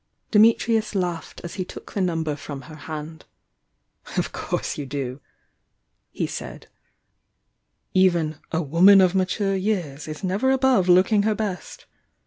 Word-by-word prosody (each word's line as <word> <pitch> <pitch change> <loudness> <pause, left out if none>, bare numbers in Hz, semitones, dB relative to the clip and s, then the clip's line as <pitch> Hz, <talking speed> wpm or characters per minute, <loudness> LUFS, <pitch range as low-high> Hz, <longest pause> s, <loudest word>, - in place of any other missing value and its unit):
Dimitrius 220 0 +3
laughed 175 -3 -3
as 170 - -7
he 185 - -3
took - - -11
the 200 - -1
number 165 -4 -1
from 145 -1 -8
her 155 - -11
hand. 155 +1 -8 0.9
"Of - - 0
course - - -3
you 145 - -6
do!" 135 -1 -4 0.9
he - - -3
said. - - -7 1.3
"Even 170 -5 +2
'a 165 +1 0
woman 180 +7 +6
of 185 -2 +4
mature 195 +1 0
years' 180 -8 -2
is 155 +3 -7
never 195 +8 +1
above 265 -8 +3
looking 190 +4 +5
her 215 +1 +1
best! 205 -4 -5
180 Hz, 135 wpm, -23 LUFS, 155-200 Hz, 1.3 s, woman